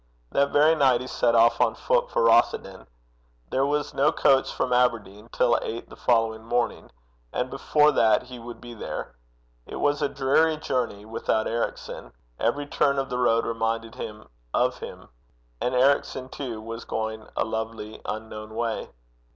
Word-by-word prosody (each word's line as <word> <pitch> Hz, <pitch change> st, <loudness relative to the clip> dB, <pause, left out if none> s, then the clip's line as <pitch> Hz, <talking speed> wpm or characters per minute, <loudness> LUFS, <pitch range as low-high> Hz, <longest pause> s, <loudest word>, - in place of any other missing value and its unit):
That 140 Hz, 0 st, +2 dB
very 150 Hz, +2 st, +5 dB
night 135 Hz, -6 st, +3 dB
he -, -, -5 dB
set 120 Hz, -2 st, +1 dB
off 115 Hz, 0 st, +5 dB
on -, -, +3 dB
foot -, -, +1 dB
for -, -, +1 dB
Rothieden. 220 Hz, -, +2 dB, 0.6 s
There 135 Hz, +1 st, +2 dB
was 150 Hz, +1 st, -1 dB
no 145 Hz, +3 st, +3 dB
coach 135 Hz, -1 st, +3 dB
from 125 Hz, -, -1 dB
Aberdeen 115 Hz, -4 st, 0 dB
till 120 Hz, -1 st, +3 dB
eight 115 Hz, +1 st, -5 dB
the -, -, -10 dB
following 115 Hz, -2 st, +1 dB
morning, 120 Hz, +1 st, -1 dB, 0.4 s
and 125 Hz, +1 st, -2 dB
before 150 Hz, 0 st, +3 dB
that 110 Hz, -6 st, +3 dB
he 125 Hz, -1 st, -10 dB
would 120 Hz, 0 st, -9 dB
be 120 Hz, -1 st, -10 dB
there. 105 Hz, -, -6 dB, 0.5 s
It -, -, -7 dB
was 145 Hz, +1 st, +1 dB
a 145 Hz, -, +1 dB
dreary 145 Hz, +4 st, +2 dB
journey 120 Hz, -8 st, -2 dB
without 110 Hz, 0 st, -1 dB
Ericson. 115 Hz, -, -4 dB, 0.3 s
Every 140 Hz, +6 st, 0 dB
turn 140 Hz, -1 st, +1 dB
of 135 Hz, 0 st, -2 dB
the 125 Hz, -, -1 dB
road 115 Hz, -2 st, +3 dB
reminded 115 Hz, 0 st, -2 dB
him 105 Hz, 0 st, -8 dB, 0.3 s
of -, -, +1 dB
him. -, -, -9 dB, 0.5 s
And 125 Hz, -, 0 dB
Ericson 130 Hz, 0 st, +2 dB
too 125 Hz, -6 st, -5 dB
was 115 Hz, +1 st, -6 dB
going 110 Hz, 0 st, -4 dB
a -, -, +2 dB
lonely 110 Hz, -1 st, -5 dB
unknown 110 Hz, 0 st, -6 dB
way. 115 Hz, -1 st, -2 dB
120 Hz, 165 wpm, -25 LUFS, 110-140 Hz, 0.6 s, very